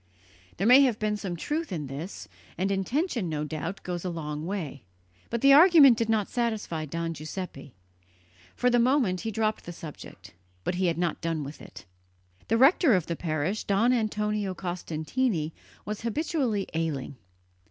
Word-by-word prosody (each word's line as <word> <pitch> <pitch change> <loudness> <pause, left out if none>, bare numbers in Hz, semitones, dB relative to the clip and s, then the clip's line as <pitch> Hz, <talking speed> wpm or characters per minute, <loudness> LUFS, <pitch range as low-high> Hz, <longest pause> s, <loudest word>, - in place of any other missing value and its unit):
There 195 - -1
may 250 +4 +8
have 250 -6 +3
been 215 -1 0
some 195 -4 -4
truth 300 - -3
in 155 -5 -3
this; 145 +8 -7 0.3
and 190 +2 0
intention, 230 - -1
no 150 -1 -2
doubt, 165 +5 -5
goes 175 -2 -4
a 185 - -2
long 155 -2 -5
way; 165 -9 -4 0.5
but 235 -1 -2
the 275 0 +7
argument 300 -5 +8
did 225 0 -1
not 215 -3 +2
satisfy 220 -9 -2
Don 165 +2 -3
Giuseppe. 155 -3 -7 0.8
For 250 - +2
the 245 - +4
moment 235 -7 +2
he 225 - -3
dropped 220 0 -1
the 175 - -6
subject, 160 -3 -11 0.3
but - - -1
he 180 +1 0
had 165 -2 0
not 175 -2 -1
done 165 -2 -2
with 140 +2 -9
it. - - -12 0.6
The 225 - +2
rector 270 - +5
of 180 -4 0
the 170 - -3
parish, 160 +5 -2
Don 220 +5 +2
Antonio 210 -4 -1
Costantini, 175 +1 -2 0.3
was 210 0 -4
habitually 240 - -1
ailing. 155 -5 -3
195 Hz, 165 wpm, -27 LUFS, 165-235 Hz, 0.8 s, may